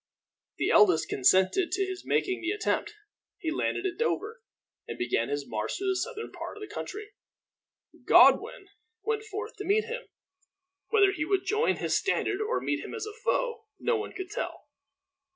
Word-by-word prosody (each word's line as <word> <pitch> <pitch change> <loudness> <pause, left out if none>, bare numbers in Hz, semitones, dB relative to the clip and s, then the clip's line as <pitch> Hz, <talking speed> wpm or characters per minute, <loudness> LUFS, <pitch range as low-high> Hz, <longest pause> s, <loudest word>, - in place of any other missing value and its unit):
The - - +1
eldest 180 -6 +5
consented 190 - +3
to 390 0 +1
his 375 0 -6
making 375 -1 0
the 350 - -2
attempt. 425 +1 -1 0.4
He 320 - -3
landed 360 +3 -1
at 370 +1 -3
Dover, 465 0 -1 0.5
and - - -6
began 120 -1 0
his 145 0 -3
march 105 -1 -3
through 390 0 -1
the 380 - +2
southern 450 +3 -4
part - - -7
of - - -11
the 420 - -8
country. 420 0 -6 1.0
Godwin 390 - +5 0.3
went 440 -1 0
forth 425 -1 -6
to - - -5
meet 415 +2 +2
him. 480 +2 -6 0.8
Whether 405 -3 +5
he 305 -6 -2
would 385 +3 0
join 425 +4 +2
his - - -1
standard 405 +1 0
or 435 +3 0
meet - - -2
him - - -7
as 440 -2 -4
a 430 - -7
foe, 460 0 -1
no 475 - +1
one 425 -1 -4
could 375 -2 -6
tell. - - -5
400 Hz, 175 wpm, -28 LUFS, 355-435 Hz, 1.0 s, eldest